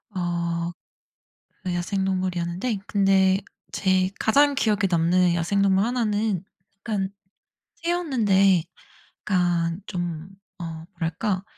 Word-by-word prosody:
어 170 -1 -1 0.9
네 180 - -1
야생동물이었는데 185 +2 -1
근데 195 -1 +3 0.3
제 185 -1 +2
가장 285 +5 +4
기억에 215 -6 +1
남는 175 +1 +3
야생동물 195 +3 +2
하나는 215 -5 0 0.4
약간 195 -3 -2 0.7
새였는데 225 - +2 0.6
약간 175 -3 0
좀 175 -3 -4 0.3
어 175 - -5 0.3
뭐랄까? 180 +3 -2
190 Hz, 205 characters per minute, -24 LUFS, 175-205 Hz, 0.9 s, 가장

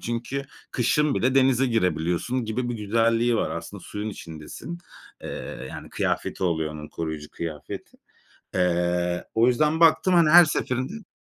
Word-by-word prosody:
Çünkü 120 +4 -3 0.3
kışın 140 +4 +2
bile 130 +1 +1
denize 135 -1 +4
girebiliyorsun 90 +2 0
gibi 120 +3 -2
bir 120 - -2
güzelliği 115 +2 +2
var. - - 0
Aslında - - -6
suyun 105 +1 -5
içindesin. 80 - -8 0.4
Eee, 65 - -6
yani - - -8
kıyafeti - - -1
oluyor 80 -3 0
onun, 75 0 -8
koruyucu 80 -2 -5
kıyafeti. 80 -3 -7 0.6
Eee, 90 -1 +1
o 115 +1 +4
yüzden 150 +6 +2
baktım, 170 +3 +5
hani, 170 -3 +5
her 175 +2 +10
seferinde 155 - -2
115 Hz, 140 wpm, -25 LUFS, 85-135 Hz, 0.6 s, her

